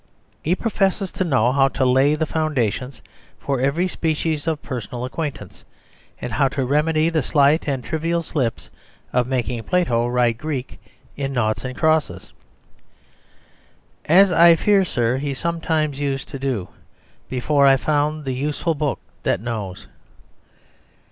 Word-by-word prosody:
He 170 +4 +1
professes 195 -3 0
to 190 - -2
know 130 -8 +2
how 135 0 +4
to 135 -1 -1
lay 135 +4 +4
the 160 +1 -1
foundations 135 -5 -2 0.3
for 135 -3 -2
every 150 +7 +1
species 160 -2 -2
of 160 -2 -1
personal 125 0 -5
acquaintanceship, 130 - -6 0.5
and - - -5
how 135 - +3
to 135 -1 -2
remedy 155 +4 +2
the 160 -2 +1
slight 145 +2 +2
and 135 -3 -1
trivial 165 +3 -1
slips 130 -9 -3 0.4
of 125 -1 +2
making 125 -2 -2
Plato 120 -4 +1
write 120 -2 +1
Greek 145 -4 -5 0.3
in 135 -1 -3
naughts 110 -4 0
and 130 -1 -6
crosses. 160 -1 0 1.7
"As 190 +4 +6
I 170 0 +7
fear, 200 +3 +3
sir, 125 -7 0
he 140 0 -3
sometimes 160 -2 -1
used 140 -2 -2
to 135 - -7
do 130 -9 -2 0.6
Before 140 +2 +2
I 135 0 +6
found 150 +1 0
the 130 - -2
useful 150 +5 -1
book 150 -2 -2 0.2
that - - 0
knows." 105 -5 -5
140 Hz, 140 wpm, -21 LUFS, 125-160 Hz, 1.7 s, I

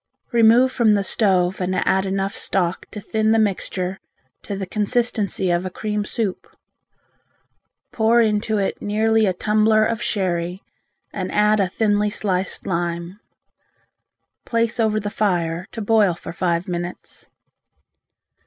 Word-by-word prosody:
Remove 235 +2 +5
from 230 -5 +3
the 200 -1 +1
stove 190 -3 +1
and 185 +1 -1
add 190 +1 +1
enough 195 +2 -2
stock 180 -2 0
to 210 - -7
thin 220 +2 -1
the 225 - +4
mixture 190 -3 -1 0.4
to 200 - -5
the 195 0 -4
consistency 210 -2 -1
of 175 +1 +1
a 185 - -3
cream 210 +2 -3
soup. 210 -4 -3 1.4
Pour 230 +1 +3
into 215 -1 +1
it 195 -1 -2
nearly 220 +1 +2
a 185 - +1
tumbler 215 +3 +2
of 230 +1 -2
sherry 180 -2 -2 0.5
and - - -4
add 210 0 +3
a 195 - +2
thinly 210 +1 +1
sliced 190 -2 -2
lime. 170 +1 -3 1.2
Place 230 0 -1
over 215 -1 +2
the 205 0 -4
fire 175 -4 -1
to 225 - -5
boil 205 -4 +3
for 165 - -9
five 170 -1 -1
minutes. 175 0 -7
205 Hz, 135 wpm, -21 LUFS, 185-220 Hz, 1.4 s, Remove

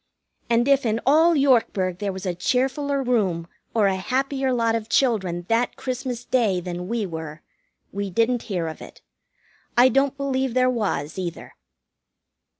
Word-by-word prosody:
And 235 +2 +2
if 275 0 +4
in 225 -1 0
all 320 +5 +5
Yorkburg 225 - +2
there 205 -1 -2
was 190 +1 -7
a 180 - -1
cheerfuller 270 - 0
room 195 -9 +1 0.3
or 215 -3 +4
a 195 -1 +2
happier 265 +6 -1
lot 230 -2 +1
of 225 -1 -3
children 190 -11 +1
that 230 +3 +1
Christmas 250 -2 -4
Day 220 -8 +1
than 180 0 -5
we 230 0 -1
were, 160 -3 -7 0.5
we 200 0 -3
didn't 230 +5 +1
hear 175 -5 -1
of 160 - -7
it. - - -13 0.7
I 250 +2 +7
don't 275 +2 +1
believe 265 -2 -1
there 255 0 +3
was, 190 - -2
either. 170 -3 -6
230 Hz, 155 wpm, -23 LUFS, 185-260 Hz, 0.7 s, I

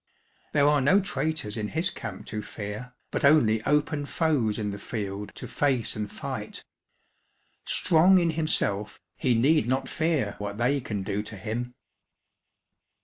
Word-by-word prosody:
There 145 -1 +4
are 145 -1 +4
no 170 +10 +5
traitors 160 - -2
in 105 -1 -2
his 160 - 0
camp 110 -6 -7
to 105 0 -4
fear, 105 +4 -7 0.2
but - - -2
only 115 -7 +5
open 150 0 +1
foes 140 -12 +1
in 105 -2 -2
the 100 - -6
field 100 -2 -5
to - - -7
face 135 -5 0
and 105 -1 -4
fight. - - -6 1.0
Strong 180 +2 +5
in 170 -2 +3
himself, 105 -10 -1 0.2
he 125 -3 +1
need 135 +2 +3
not 130 +1 0
fear 155 -11 0
what 100 0 -4
they 130 +4 +1
can 105 -5 -3
do 100 +2 -1
to 105 0 -8
him. 120 +5 -4
125 Hz, 150 wpm, -27 LUFS, 105-150 Hz, 1.0 s, no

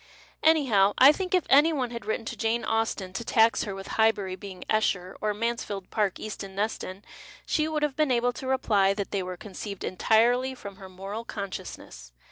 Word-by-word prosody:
Anyhow, 245 -11 +4
I 270 +3 +9
think 370 +4 -1
if 365 - +1
any 295 +4 +6
one 255 -6 -2
had 235 -3 -7
written 220 +1 -2
to - - -5
Jane 225 +1 -1
Austen 220 -4 -1
to 190 - -4
tax 230 -1 +3
her 200 -2 -5
with 195 0 -8 0.2
Highbury 205 -4 +2
being 185 -1 -9
Eshcr 195 -4 0
or 215 - +1
Mansfield 210 -4 -3
Park 205 -4 0
Easton 195 -2 -7
Ncston, 200 -2 -3 0.4
she 310 -1 +1
would 310 -1 -2
have 295 -3 0
been 305 -2 +2
able 245 0 +2
to 260 - -7
rej)ly 205 -7 +2
that 200 -1 -4
they 200 - 0
were 180 0 -5
conceived 200 0 -7
entirely 240 +7 +2
from 200 -5 -10
her 190 -2 -11
moral 195 +4 -6
consciousness. 200 - -7
220 Hz, 190 wpm, -27 LUFS, 195-245 Hz, 0.4 s, I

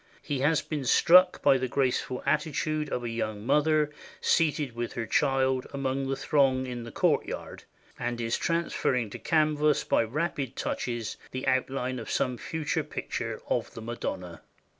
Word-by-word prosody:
He 145 -4 -2
has 150 +3 +2
been 150 -4 -4
struck 180 +7 +6
by 135 - +5
the 130 - -1
graceful 130 0 -1
attitude 155 0 0
of 125 - -2
a 120 - -2
young 110 -2 -3
mother 150 +2 +3 0.3
seated 150 -6 +1
with 120 0 -3
her 115 - -3
child 130 -1 +1
among 135 0 -1
the 135 - 0
throng 135 -2 +2
in 125 -1 -5
the 115 0 -8
courtyard, - - -1 0.3
and 120 0 -2
is 115 0 0
transfer 170 -4 0
ring 120 -5 -1
to - - -7
canvas 150 -2 +2
by - - +2
rapid 140 +1 -2
touches 120 -3 -3
the 130 +1 -5
outline 130 -1 0
of 115 - -7
some 125 -1 0
future 160 0 -2
picture 115 -6 -4
of 120 - -1
the 115 - -7
Madonna. 90 -7 -5
130 Hz, 160 wpm, -28 LUFS, 120-150 Hz, 0.3 s, struck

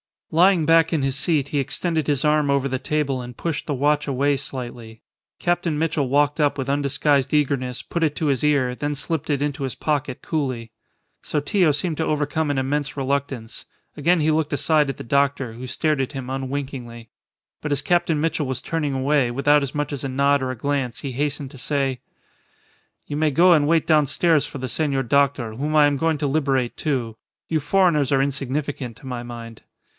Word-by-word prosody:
Lying 175 0 +4
back 165 +1 +4
in 155 - +1
his 135 -1 0
seat, 145 -2 0
he 145 - 0
extended 155 +3 -1
his 145 -3 +1
arm 150 -1 +3
over 140 -1 +2
the 130 0 -2
table 140 -2 -1
and 125 0 -9
pushed 165 -3 -3
the 150 - -1
watch 145 +2 +1
away 140 +1 +1
slightly. 120 -4 -7 0.4
Captain 175 -3 0
Mitchell 155 -3 0
walked 145 +3 +2
up 145 -1 +2
with 135 0 -3
undisguised 140 0 +1
eagerness, 135 -4 0
put 170 - -3
it 155 -2 +1
to 155 - -1
his 135 -4 +1
ear, 140 -4 +2
then 145 +3 -3
slipped 155 +1 -3
it 140 -2 0
into 145 -1 -2
his 130 - -3
pocket 145 -4 -2
coolly. 130 -8 -3 0.5
Sotillo 155 +3 +1
seemed 155 +2 -2
to 160 - 0
overcome 150 +1 0
an 145 - 0
immense 145 +2 -1
reluctance. 135 -4 -3 0.3
Again 170 +3 +3
he 155 +1 +3
looked 155 -1 0
aside 145 +1 +2
at 135 - -3
the - - -8
doctor, 135 -1 +1
who 125 +3 -8
stared 150 +3 0
at 135 - -3
him 130 -2 -6
unwinkingly. 130 -4 -5 0.5
But 150 -1 -1
as 140 - 0
Captain 170 -3 +2
Mitchell 155 -2 0
was 130 -1 -3
turning 155 -4 -2
away, 135 -1 +2
without 145 +4 +3
as 140 0 -4
much 145 0 -1
as 140 -2 -5
a - - -2
nod 140 +2 +2
or 130 - -2
a 130 - -4
glance, 135 -2 -2
he 140 - -4
hastened 140 +1 -2
to 140 - -12
say 135 -2 -1 1.1
"You 145 - -4
may 155 0 +2
go 175 +6 +5
and 150 -4 +4
wait 165 0 +3
downstairs 155 +1 +3
for - - -8
the 130 -1 -4
senor 140 +1 0
doctor, 135 -3 +1
whom 150 +5 -2
I 150 -1 +7
am 145 -1 +2
going 160 +2 +1
to 145 - 0
liberate, 135 -4 0
too. 125 -7 -2 0.3
You 160 - +1
foreigners 150 -3 +2
are 135 - +4
insignificant, 135 -2 -3
to 140 - -15
my 125 -2 -4
mind." 115 -2 -9
140 Hz, 200 wpm, -22 LUFS, 130-150 Hz, 1.1 s, I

